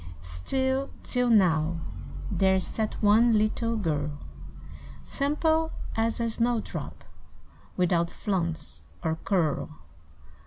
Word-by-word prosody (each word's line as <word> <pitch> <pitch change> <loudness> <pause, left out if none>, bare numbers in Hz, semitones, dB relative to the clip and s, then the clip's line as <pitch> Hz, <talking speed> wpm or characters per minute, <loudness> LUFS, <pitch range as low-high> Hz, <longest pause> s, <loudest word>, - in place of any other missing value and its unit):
Still, 265 - -1
till 250 -1 +1
now, 170 -6 +4 0.5
there 190 -1 +3
sat 215 +3 -2
one 220 +2 +6
Little 230 +2 +1
girl; 150 -6 -1 0.9
Simple 315 +3 +1 0.2
as 225 +1 0
a 235 - +1
snow 230 +1 +1
drop, - - -7 0.7
Without 170 -2 +2
flounce 170 - -2 0.2
or 160 0 0
curl. 155 - +1
205 Hz, 95 wpm, -28 LUFS, 165-235 Hz, 0.9 s, one